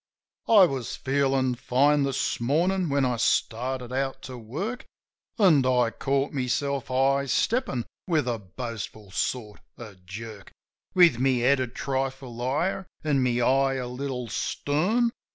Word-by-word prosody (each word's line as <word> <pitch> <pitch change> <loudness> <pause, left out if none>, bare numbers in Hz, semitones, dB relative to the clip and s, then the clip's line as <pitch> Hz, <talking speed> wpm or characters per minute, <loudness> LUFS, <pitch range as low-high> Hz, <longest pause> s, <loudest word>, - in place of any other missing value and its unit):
I 210 -4 +8
was 135 -7 -3
feelin' 135 -1 +1
fine 140 +4 +2
this 135 -1 -1
mornin' 170 +8 +1
when 140 -1 +2
I 125 -2 0
started 125 +2 -1
out 135 0 -2
to 130 - -7
work; 155 - -5 0.5
An' 175 - +5
I 125 -2 +2
caught 140 +3 -1
myself 135 +1 -1
high 135 +2 +2
steppin' 215 - 0 0.2
with 155 -7 +1
a 120 -2 -1
boastful 110 0 -7
sort 105 +1 -3 0.2
of 100 -6 -11
jerk; 105 +1 -9 0.4
With 170 -9 +6
my 135 +1 +3
head 130 +2 +3
a 130 - -1
trifle 130 -1 -4
higher 160 +10 -1 0.2
an' 145 -3 +1
my 125 -1 +1
eye 135 +2 +3
a 130 -1 -3
little 125 -1 -4
stern. 180 - 0
130 Hz, 140 wpm, -26 LUFS, 120-145 Hz, 0.5 s, I